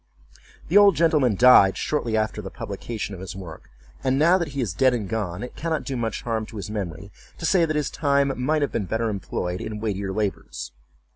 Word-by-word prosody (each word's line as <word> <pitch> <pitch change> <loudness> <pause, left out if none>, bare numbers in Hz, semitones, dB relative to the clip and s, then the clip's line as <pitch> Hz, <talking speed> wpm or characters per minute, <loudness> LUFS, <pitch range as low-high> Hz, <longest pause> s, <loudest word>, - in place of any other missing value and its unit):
The 195 +5 +6
old 200 -3 +6
gentleman 150 - +3
died 110 -5 +7
shortly 120 -7 -1
after 110 0 -1
the 95 - -7
publication 105 +2 -5
of 95 - -8
his 95 -1 -7
work, 90 -5 -10 0.3
and 130 0 +1
now 170 +6 +5
that 170 - -1
he 140 -1 -6
is 105 -9 -2
dead 130 +7 +3
and 105 -5 -3
gone, 100 -2 -3
it 125 - -8
cannot 160 -2 -2
do 135 - -4
much 115 -2 -3
harm 110 -2 -2
to 110 - -10
his 105 +1 -6
memory 100 -1 -5 0.3
to 160 - -5
say 170 0 +4
that 155 -1 -2
his 150 -3 -1
time 140 -2 +1
might 150 +4 0
have 145 - -1
been 105 - -2
better 110 +4 -1
employed 90 -3 -3
in 105 -1 -5
weightier 100 -3 -2
labors. 95 - -3
115 Hz, 215 wpm, -24 LUFS, 100-140 Hz, 0.3 s, died